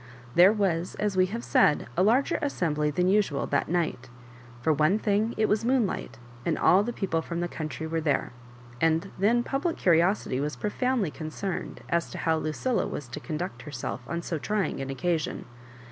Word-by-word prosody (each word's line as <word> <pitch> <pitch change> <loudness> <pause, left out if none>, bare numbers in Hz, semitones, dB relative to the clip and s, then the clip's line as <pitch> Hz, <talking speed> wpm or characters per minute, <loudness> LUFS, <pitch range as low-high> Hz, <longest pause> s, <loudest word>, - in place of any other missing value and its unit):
There 180 +3 +7
was, 185 -5 0
as 210 -2 -1
we 185 0 +4
have 230 +5 -5
said, 150 - +3
a - - +2
larger 235 +8 +3
assembly 155 - 0
than 180 +5 +1
usual 190 -8 +2
that 145 - 0
night 160 -7 -1 0.5
For 160 - +3
one 155 +7 +3
thmg, 215 +2 0
it 215 - +3
was 215 +1 +1
moonlight, 245 -4 0 0.3
and 160 - 0
all 185 - +5
the 235 +4 -2
people 185 -8 -1
from 170 +1 -4
the 175 - -1
country 160 -1 -5
were 160 0 -2
there; 150 -3 0 0.5
and 165 +4 +2
then 235 +5 +3
public 285 +7 -1
curiosity 170 -5 +2
was 150 +2 -2
profoundly 225 - 0
con 155 0 -6
cerned 190 +3 -4
as 170 0 0
to - - -7
how 160 -1 +1
Lucilla 155 - -1
was 140 - -5
to 120 - -6
conduct 175 +3 -5
herself 140 -3 -5
on 170 0 -3
so 165 - -3
trying 200 -5 -1
an 135 - -4
occasion. 160 +3 -2
175 Hz, 185 wpm, -27 LUFS, 155-210 Hz, 0.5 s, There